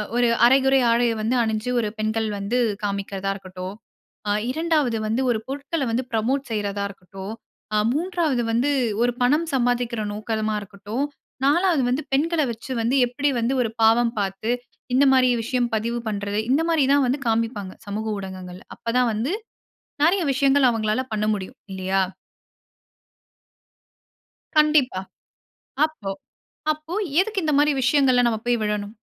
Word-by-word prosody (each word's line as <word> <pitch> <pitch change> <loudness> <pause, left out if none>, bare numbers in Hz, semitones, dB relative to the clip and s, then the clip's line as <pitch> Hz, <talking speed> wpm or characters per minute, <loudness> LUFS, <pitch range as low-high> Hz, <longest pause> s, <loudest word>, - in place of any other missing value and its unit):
ஒரு 245 0 +3 0.2
அரைகுறை 265 +2 +5
ஆடை 235 +1 +3 0.2
வந்து 225 +4 +1
அணிஞ்சு 220 +1 -2
ஒரு 215 - -1
பெண்கள் 220 +1 0
வந்து 200 +5 -1 0.3
காமிக்குறதா 200 -1 -2
இருக்கட்டும், 185 0 -7 0.5
ஆ - - +2 0.2
2வது 305 -5 +1
வந்து 225 +4 0
ஒரு 225 - 0
பொருட்கள 280 +3 -3
வந்து 240 +3 0
ப்ரமோட் 255 +5 0
செய்றதா 205 -2 -2
இருக்கட்டும், 195 +1 -9 0.4
ஆ - - +3 0.2
3வது 320 -5 0
வந்து 245 +6 +2 0.3
ஒரு 245 0 +2
பணம் 300 +7 +2
சம்பாதிக்கிற 245 -3 0
நோக்கமா 215 0 -2
இருக்கட்டும், 205 +6 -4 0.4
4வது 330 0 +3
வந்து 255 +5 0
பெண்கள 320 +4 +2
வச்சு 230 +3 -8
வந்து 235 +4 +1
எப்பிடி 285 +4 0
வந்து 235 +3 +1
ஒரு 230 - 0
பாவம் 230 +1 +4
பாத்து, 200 +3 -2 0.4
இந்த 275 +2 +5
மாதிரி 255 -1 +5
விஷயம் 245 0 0
பதிவு 230 +2 -1
பண்ணுறது, 205 0 -2
இந்தமாரி 320 0 +3
தான் 285 -1 +4
வந்து 260 +4 0
காமிப்பாங்க. 225 -4 -1
சமூக 215 +2 -3
ஊடகங்கள்ல. 185 -1 -8
அப்ப 230 - -3
தான் 245 -2 +3
வந்து 235 - -1 0.7
நெறைய 360 +4 +3
விஷயங்கள் 270 0 +4
அவங்களால 220 +1 0
பண்ண 210 0 0
முடியும் 190 -2 -7
இல்லயா? 190 0 0 2.5
கண்டிப்பா. 300 -9 +4 0.9
அப்போ 275 -11 -6 0.6
அப்போ 310 +3 -5 0.2
எதுக்கு 400 0 +1
இந்தமாரி 295 -1 +3
விஷயங்கள்ல 255 -1 +4
நம்ம 225 -2 0
போய் 240 -1 +2
விழணும்? 210 -1 -2
240 Hz, 135 wpm, -23 LUFS, 210-275 Hz, 2.5 s, அரைகுறை